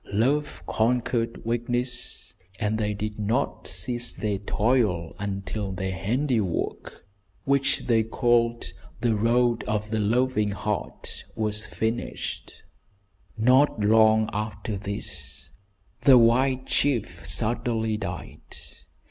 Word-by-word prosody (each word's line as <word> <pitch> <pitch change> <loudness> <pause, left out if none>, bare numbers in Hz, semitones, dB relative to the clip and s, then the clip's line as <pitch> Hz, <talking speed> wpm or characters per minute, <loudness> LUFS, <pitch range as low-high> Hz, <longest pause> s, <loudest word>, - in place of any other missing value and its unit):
Love 140 +8 0
conquered 115 0 0
weakness, 120 +1 -2 0.3
and 110 0 0
they 105 -1 0
did 105 +1 -4
not 110 +6 -1
cease 120 -1 0
their 105 -2 -2
toil 105 -5 +1
until 100 0 -3
their 95 0 -3
handiwork, 110 - -2 0.4
which 140 0 +1
they 115 -2 +3
called 115 +1 +1 0.3
"The 115 -2 +2
Road 115 +1 +2
of 105 0 -2
the 110 - 0
Loving 105 -1 +1
Heart," 95 - -4
was 105 0 -1
finished. 110 +2 -4 0.7
Not 125 +4 +4
long 110 +1 +5
after 105 +1 -3
this 90 -9 -4 0.5
the 135 -2 +7
white 130 +3 +3
chief 110 -12 0
suddenly 110 -1 0
died. 105 - -6
110 Hz, 105 wpm, -26 LUFS, 105-120 Hz, 0.7 s, the